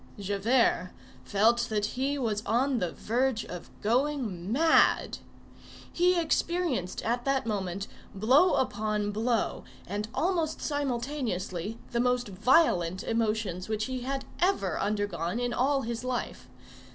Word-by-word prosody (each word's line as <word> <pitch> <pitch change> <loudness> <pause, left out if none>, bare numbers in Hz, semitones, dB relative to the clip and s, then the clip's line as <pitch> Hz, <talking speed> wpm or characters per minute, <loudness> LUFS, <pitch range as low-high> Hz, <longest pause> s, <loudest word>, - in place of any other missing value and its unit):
Javert 200 0 +1 0.3
felt 225 - +2
that 210 -1 0
he 275 +3 -1
was 220 -6 -1
on 255 +2 +2
the 180 -4 -1
verge 240 0 0
of 175 -1 -8
going 230 -6 0
mad. 320 +6 +3 0.7
He 360 0 +3
experienced 330 - -1
at 240 +2 -1
that 275 -2 +1
moment, 195 -3 -3 0.3
blow 260 - +4
upon 215 -4 0
blow 225 +2 0 0.2
and 205 +3 -3
almost 335 -3 0
simultaneously, 240 - -2
the 235 - 0
most 250 -2 +1
violent 190 - +3
emotions 220 -5 -1
which 215 0 -1
he 260 -1 -3
had 270 +2 -3
ever 345 - +1
undergone 205 -2 -1
in 245 -1 -1
all 270 +2 +1
his 235 +1 -4
life. 255 -1 -4
235 Hz, 125 wpm, -29 LUFS, 205-265 Hz, 0.7 s, blow